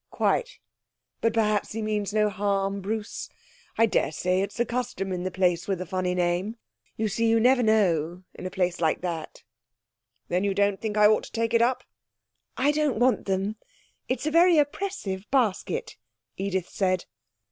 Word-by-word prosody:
'Quite. - - 0 0.6
But 230 - +3
perhaps 215 -2 +1
he 225 - -3
means 210 -2 -1
no 210 0 +3
harm, 195 0 -1
Bruce. 215 +2 -4 0.5
I 225 - +6
daresay 185 -3 0
it's 200 - -4
the 240 - +2
custom 240 -5 -3
in 180 -1 -2
the 185 - -2
place 180 -2 +1
with 195 -2 0
the 185 - -5
funny 180 0 -1
name. 180 +5 0 0.4
You 220 - 0
see, 225 +3 0
you 225 0 +4
never 250 +2 +4
know, 180 -6 +2
in 185 - -6
a - - -4
place 180 -2 -1
like 160 -2 +1
that.' 170 -3 -5 0.8
'Then 180 +2 0
you 200 -1 0
don't 200 -1 +1
think 215 -1 -3
I 210 - +6
ought 215 +1 +4
to - - -13
take 230 0 -1
it 230 - +4
up?' 245 +2 +2 0.7
'I 285 +3 +3
don't 300 -6 0
want 245 -3 +2
them. 195 +2 -1 0.5
It's 255 +2 -1
a 310 - 0
very 340 +1 +5
oppressive 290 - -2
basket,' 245 -8 0 0.4
Edith 190 -2 -2
said. 185 -2 0
205 Hz, 175 wpm, -26 LUFS, 185-230 Hz, 0.8 s, I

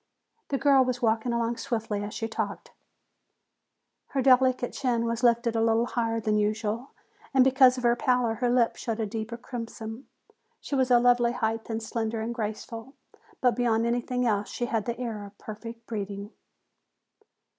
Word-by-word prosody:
The 275 - 0
girl 270 -1 +5
was 250 -1 -2
walking 225 +1 +2
along 235 0 0
swiftly 220 -5 -2
as 205 - -5
she 225 - -2
talked. 220 - -4 1.4
Her 270 - -1
delicate 255 -1 +4
chin 240 -3 0
was 230 0 -2
lifted 235 -1 +3
a 225 - +2
little 225 +1 +3
higher 230 -2 -1
than 210 -1 +1
usual 215 +4 -1 0.5
and 260 - +7
because 260 -1 +5
of 250 - -5
her 240 0 +4
pallor 250 -3 +1
her 245 +2 0
lips 240 -1 +2
showed 230 -1 -3
a 220 - 0
deeper 220 +2 -5
crimson. 230 0 -7 0.5
She - - -8
was 260 -2 +2
a 245 - +7
lovely 240 0 +4
height 225 -1 -2
and 225 0 -3
slender 225 0 -2
and 225 +2 -3
graceful, 225 +3 -5 0.5
but 250 -2 +3
beyond 230 -2 +2
everything 245 +1 0
else 205 -3 0
she 240 - -3
had 225 -3 -1
the 235 0 -3
air 225 -4 -4
of 200 0 -12
perfect 230 +2 -9
breeding. 200 -2 -5
235 Hz, 170 wpm, -27 LUFS, 225-245 Hz, 1.4 s, and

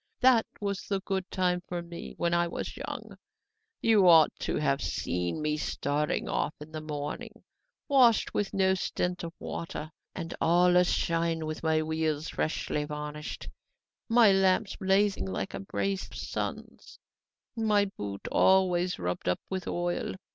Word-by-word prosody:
That 250 -3 +5
was 200 -2 -3
the 200 -1 0
good 190 -1 -3
time 180 -2 0
for 175 -1 -4
me, 170 0 -9
when 170 0 0
I 170 0 +3
was 170 - -5
young! - - -7 0.6
You 215 -5 +5
ought 160 -3 +7
to - - -2
have 140 -2 +1
seen 90 - -2
me 150 0 0
starting 150 +2 -1
off 155 - -1
in 150 +1 -10
the 155 -1 -5
morning, 155 +10 -6 0.4
washed 250 -5 +4
with 205 - -1
no 190 -1 +3
stint 180 -1 -2
of 165 - -4
water 155 -2 -6 0.2
and 165 - -5
all 175 +2 +4
a 180 - +7
shine, 165 -2 0
with 155 0 -4
my 160 -1 +2
wheels 160 -1 -1
freshly 150 -1 -1
varnished, 150 0 -6 0.6
my 230 -3 +6
lamps 195 +2 +2
blazing 195 +1 +2
like 190 - -3
a - - -4
brace 195 0 -2
of - - -14
suns, - - -5 0.6
and 225 -1 -1
my 205 -1 +4
boot 100 - -6
always 185 -1 +3
rubbed 90 0 -2
up 90 - +1
with 190 -1 -3
oil! 175 0 -2
175 Hz, 155 wpm, -29 LUFS, 155-195 Hz, 0.6 s, ought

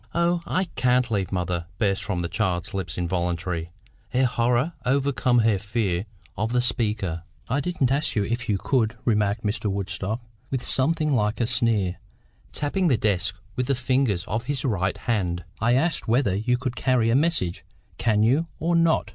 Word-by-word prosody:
"Oh, 170 0 +2
I 185 - +1
can't 125 -1 +2
leave 100 -4 0
mother!" 90 -2 -2
burst 100 -1 +1
from 95 -3 -2
the - - -1
child's 95 0 -1
lips 90 -4 -3
involuntarily, 85 -1 -2 0.4
her 130 +1 +2
horror 120 +5 +1
overcoming 125 -3 +2
her 105 -4 +3
fear 105 -3 -1 0.3
of 110 +3 -1
the 125 - +3
speaker. 105 -7 0 0.3
"I 130 +4 0
didn't 145 -5 0
ask 145 +3 +1
you 105 - +2
if 120 +2 -3
you 100 - +2
could," 115 +1 0
remarked 105 -1 +1
Mr. 105 0 -1
Woodstock, 100 +2 -3 0.3
with 130 -2 -2
something 155 +2 +2
like 105 -3 +1
a 120 - +2
sneer, 110 -6 +2 0.5
tapping 175 +5 0
the 130 -7 +3
desk 105 -2 0 0.2
with 125 -1 -1
the 140 - +2
fingers 125 -7 +1
of 110 +3 -3
his 145 0 -2
right 95 -6 0
hand. 90 -6 -1 0.2
"I 120 +2 +3
asked 165 +5 0
whether 115 -3 +2
you 120 +5 +1
could 125 0 -3
carry 120 -3 +2
a - - +3
message. 140 - +1 0.4
Can 110 -2 +3
you, 140 +9 +3
or 170 +2 +1
not?" 165 -1 +3
115 Hz, 175 wpm, -25 LUFS, 100-130 Hz, 0.5 s, her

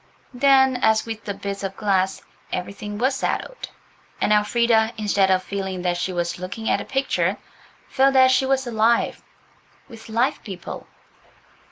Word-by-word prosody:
Then, 265 0 +4
as 220 -2 +2
with 225 -1 -7
the 200 - -3
bits 200 0 -5
of 195 -1 -5
glass, 195 -2 0 0.3
everything 205 +3 -5
was 260 +5 +1
settled, - - -3 0.5
and 210 - +2
Elfrida, 220 +1 +2
instead 200 -2 +2
of 185 -1 +2
feeling 190 -2 -4
that 175 -1 0
she 185 - -2
was 175 -1 -2
looking 200 +5 -6
at - - +1
a - - -7
picture, 270 0 0 0.5
felt 270 0 +3
that 260 -1 +6
she 260 +1 +2
was 265 0 +1
alive, 230 0 +1 0.7
with 225 -3 -13
live 235 +4 0
people. 190 -5 -8
220 Hz, 155 wpm, -22 LUFS, 195-255 Hz, 0.7 s, that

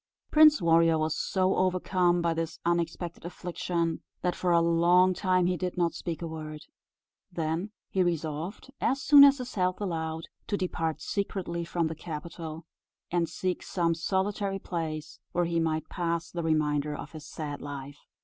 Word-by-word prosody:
Prince 305 - +7
Warrior 165 -1 +5
was 155 0 0
so 185 +2 +1
overcome 180 -1 +2
by 170 -1 +2
this 165 0 -3
unexpected 170 0 -1
affliction, 170 -1 -2 0.2
that 180 - +1
for 180 - 0
a 170 - +6
long 170 +2 +4
time 185 -1 +2
he 180 +1 +2
did 180 +1 -3
not 170 -1 +2
speak 170 -1 -5
a - - -2
word. 155 -1 -7 0.7
Then 165 +3 -2 0.2
he 190 - 0
resolved, 170 - -2
as 270 - +2
soon 285 +1 +8
as 280 0 +7
his 250 -1 -6
health 185 -1 0
allowed, 160 -4 -3 0.2
to 205 - 0
depart 165 -4 -2
secretly 190 -4 -2
from 170 0 -1
the 160 - -2
capital, 160 0 -7 0.5
and 170 -1 +1
seek 185 -1 -2
some 170 -2 0
solitary 195 +3 -1
place 155 -5 -5
where 175 0 +2
he 170 0 0
might 160 -1 0
pass 170 -1 -2
the 175 - -3
remainder 150 -2 +1
of - - -8
his 155 -2 -9
sad 145 -2 -5
life. 145 0 -7
170 Hz, 165 wpm, -29 LUFS, 160-185 Hz, 0.7 s, soon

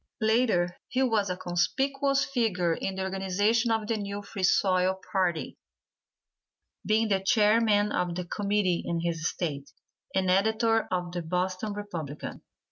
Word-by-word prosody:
Later, 220 -6 +2
he 260 +1 0
was 220 -6 +1
a 180 - -2
conspicuous 275 +11 0
figure 205 -10 0
in 190 +3 -3
the 190 - -2
organization 195 +5 +1
of 220 -1 +1
the 225 +1 -1
new 200 0 -5
Free 200 -1 -7
Soil 185 0 +2
party, 180 -5 -1 1.2
being 215 +2 +2
the 195 -2 +2
Chairman 210 0 +3
of 175 -1 -1
the 180 0 -3
committee 200 -2 0
in 170 -1 -2
his 165 -1 -1
State, 145 -5 -4 0.5
and 190 -1 +2
editor 220 +3 +2
of 180 -1 -2
the 175 0 -3
Boston 185 +5 -2
Republican. 170 -8 -6
195 Hz, 140 wpm, -28 LUFS, 180-220 Hz, 1.2 s, Chairman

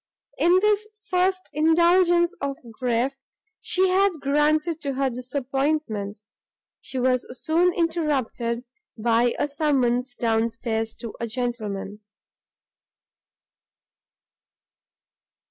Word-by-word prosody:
In 350 +2 +5
this 425 0 +2 0.2
first 370 +1 +1
indulgence 345 +3 +4
of 275 -1 -2
grief 245 +2 0
which 270 - -35 0.4
she 375 0 +2
had 390 +1 +3
granted 300 +3 +1
to 280 -3 -3
her 270 -1 0
disappointment, 250 -4 -2 0.6
she 265 - -7
was 255 0 +1 0.2
soon 345 +3 +3
interrupted 290 -9 -1 0.3
by 235 +2 +2
a - - 0
summons 260 -4 0
down 225 -1 +1
stairs 225 -1 -3
to 230 -3 -6
a 235 - -2
gentleman. 215 -4 -4
275 Hz, 95 wpm, -24 LUFS, 235-330 Hz, 0.6 s, In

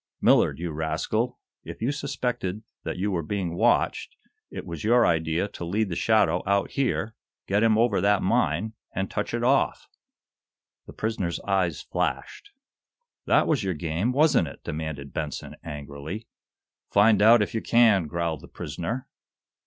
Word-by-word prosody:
Millard, - - +4
you 85 0 -4
rascal, 80 +1 -1 0.3
if - - -9
you 120 +5 0
suspected 125 -8 -3 0.2
that - - -4
you 100 +3 -1
were 90 -3 0
being 90 +1 -3
watched, - - +1 0.3
it - - -7
was 85 -2 -6
your 120 +2 +4
idea 80 +3 +1
to 95 - -8
lead 100 +5 0
the 85 - -3
shadow 90 -1 +3
out 100 0 +1
here, 125 -5 -1 0.3
get 100 +2 +1
him 110 -1 +4
over 115 -5 +2
that 100 0 +3
mine 95 +4 +1 0.2
and 95 0 -2
touch - - -2
it 120 0 -2
off!" 135 +2 +2 1.0
The - - -10
prisoner's 100 -6 -2
eyes 95 -3 0
flashed. 410 - -3 0.8
"That - - +4
was 140 -8 +1
your 95 -2 -1
game, 85 +8 -1
wasn't 145 - +3
it?" 70 - -11
demanded 75 -3 -5
Benson, - - -5
angrily. 75 +8 -7 0.6
"Find 105 0 +5
out, 110 +1 +7
if - - -5
you 110 - -1
can," 110 -8 +4
growled 85 -2 -2
the - - -12
prisoner. 115 +10 -5
100 Hz, 155 wpm, -26 LUFS, 85-115 Hz, 1.0 s, out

